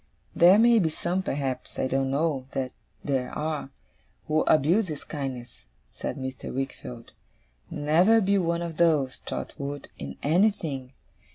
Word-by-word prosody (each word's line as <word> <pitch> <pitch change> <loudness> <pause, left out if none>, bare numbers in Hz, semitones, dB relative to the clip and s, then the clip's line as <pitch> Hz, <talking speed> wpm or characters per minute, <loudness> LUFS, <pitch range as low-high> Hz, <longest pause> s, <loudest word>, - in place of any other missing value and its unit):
'There 180 +4 +7
may 230 +1 +6
be 165 -5 +2
some, 175 +4 -1
perhaps 135 -7 -3
I - - 0
don't 135 0 0
know 140 -2 0
that 130 -1 -2 0.3
there 130 -3 -1
are 150 -2 -3 0.6
who 155 0 +2
abuse 170 +8 +4
his 155 -3 -5
kindness,' 130 - -6 0.3
said - - -5
Mr. 130 -1 -5
Wickfield. 125 -3 -6 0.6
'Never 165 +10 +4
be 200 -1 +2
one 170 -1 0
of 165 -2 -5
those, 150 -6 +2
Trotwood, 140 -1 -6
in - - -6
anything. 155 -6 +1
150 Hz, 140 wpm, -27 LUFS, 135-170 Hz, 0.6 s, There